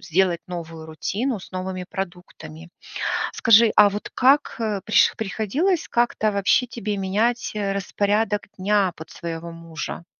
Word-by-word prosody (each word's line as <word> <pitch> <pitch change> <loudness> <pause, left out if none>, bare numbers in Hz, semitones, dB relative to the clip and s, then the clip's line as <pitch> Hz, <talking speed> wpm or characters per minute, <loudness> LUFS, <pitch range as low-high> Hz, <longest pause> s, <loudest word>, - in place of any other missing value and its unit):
сделать 175 0 +1
новую 165 -2 -7
рутину 205 - -3
с - - -14
новыми 185 0 -4
продуктами. 175 -3 -8 0.6
Скажи, 225 0 +5
а 210 -1 +8
вот 205 +1 -6
как, 275 +3 +3
э, 215 -3 -1
приш 215 - +4
приходилось 225 - -1
как-то 235 -3 +1
вообще 200 +5 +2
тебе 220 -4 -4
менять, 215 +6 0
э, 200 -2 -1
распорядок 205 +2 0 0.2
дня 195 -1 +2
под 160 - -11
своего 170 0 -6
мужа? 165 0 -7
200 Hz, 135 wpm, -23 LUFS, 175-220 Hz, 0.6 s, а